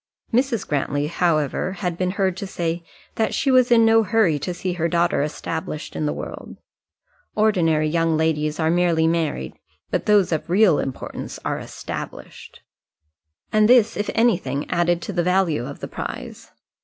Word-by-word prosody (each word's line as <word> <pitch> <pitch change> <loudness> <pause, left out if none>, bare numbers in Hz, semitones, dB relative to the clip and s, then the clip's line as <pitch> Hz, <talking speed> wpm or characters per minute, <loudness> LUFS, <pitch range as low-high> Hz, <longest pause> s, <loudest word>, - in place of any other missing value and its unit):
Mrs. 245 -3 +1
Grantly, 145 0 -1
however, 160 +1 0
had 180 -2 -3
been 185 +1 -1
heard 190 -2 +1
to 200 - -5
say, 170 -2 -3 0.3
that 220 - 0
she 270 - +1
was 255 -1 +5
in 230 -2 +5
no 225 0 +5
hurry 205 -7 +2
to 180 - -3
see 180 +1 -3
her 170 -1 -1
daughter 170 -3 +1
established 155 +2 -4
in 150 - -1
the - - 0
world; - - -7 0.8
ordinary 170 -8 +2
young 165 0 +1
ladies 155 -1 0
are 160 0 +2
merely 170 -2 +2
married, 160 - -1 0.4
but - - -1
those 205 -4 +4
of 160 0 -2
real 185 -3 +4
importance 135 - -5
are - - -1
established: - - -8 0.9
and 215 0 +4
this, 240 -3 +5
if 205 - -2
anything, 175 - +1
added 175 0 +1
to 205 - -5
the 175 - +1
value 175 -7 +1
of - - -9
the - - -4
prize. - - -7
175 Hz, 165 wpm, -22 LUFS, 160-205 Hz, 0.9 s, was